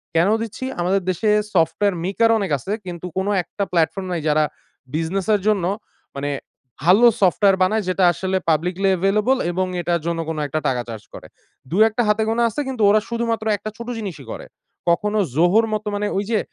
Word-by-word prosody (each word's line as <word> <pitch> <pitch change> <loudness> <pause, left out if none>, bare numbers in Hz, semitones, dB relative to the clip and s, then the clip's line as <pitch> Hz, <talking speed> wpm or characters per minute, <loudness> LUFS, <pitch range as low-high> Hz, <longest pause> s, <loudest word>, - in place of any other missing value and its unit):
কেন 170 +4 +4
দিচ্ছি? 230 +3 -6 0.2
আমাদের 190 +3 +1
দেশে 210 +4 -1 0.3
software 180 +4 +2
maker 215 +5 +2
অনেক 195 -5 -2
আছে। 160 +10 -7
কিন্তু 175 -1 -7
কোন 190 +1 0 0.2
একটা 200 - -4
platform 170 +3 +1
নাই 170 - -2
যারা 155 +1 +3 0.5
বিজনেসের 190 +6 0
জন্য 210 -4 +2 0.5
মানে 145 +1 -2 0.5
ভালো 195 +9 +6
software 195 +1 +4
বানায় 215 +3 +1
যেটা 185 0 +1
আসলে 190 +4 -1
publicly 180 +5 +1
available 210 +7 +2
এবং 185 +1 -1
এটার 170 -1 0
জন্য 170 -1 -1
কোন 160 - -3
১ 155 +3 -2
টাকা 125 -2 0
চার্জ 110 -2 -7
করে। - - -10 0.4
২ 175 - 0
১ 225 +2 -1
হাতে 210 +1 +2
গোনা 230 +1 +1
আছে 295 - -3
কিন্তু 255 -5 -2
ওরা 215 +1 +4
শুধুমাত্র 230 -1 -2
একটা 215 - -6
ছোট 235 0 -8
জিনিসই 180 -10 -6
করে। - - -7 0.4
কখনো 210 +5 +1 0.2
ZOHO-র 180 +8 +4
মতো 215 0 -3
মানে 205 +1 -1
ওইযে 210 +2 0
195 Hz, 180 wpm, -21 LUFS, 170-215 Hz, 0.5 s, ভালো